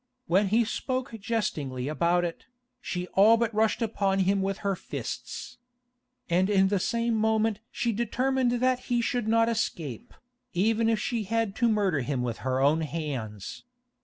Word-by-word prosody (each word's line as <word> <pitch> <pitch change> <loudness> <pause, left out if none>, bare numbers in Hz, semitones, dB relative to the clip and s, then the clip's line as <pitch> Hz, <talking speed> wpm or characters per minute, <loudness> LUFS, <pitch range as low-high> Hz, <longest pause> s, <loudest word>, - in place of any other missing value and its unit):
When 190 +4 +3
he 225 +4 +3
spoke 255 +2 -3
jestingly 150 - -2
about 170 +3 +2
it, 170 - -6 0.3
she 180 -1 -3
all 215 +4 +6
but 230 -1 0
rushed 220 +2 +2
upon 200 -3 0
him 195 +1 +2
with 195 0 -1
her 200 -1 +1
fists. - - -6 0.7
And 180 +3 +2
in 190 -2 +4
the 200 -1 +1
same 235 +4 0
moment 220 -1 +1
she 235 - -1
determined 245 +3 0
that 255 +1 +1
he 240 -1 +2
should 235 -1 -1
not 230 +1 +4
escape, 165 - -3 0.4
even 220 +5 +2
if 225 - +2
she 225 -1 -2
had 225 -1 -1
to 240 -2 +3
murder 200 -8 +2
him 130 0 -2
with 120 -2 -3
her 130 0 -1
own 145 +4 +3
hands. 135 - -5
205 Hz, 160 wpm, -27 LUFS, 170-230 Hz, 0.7 s, all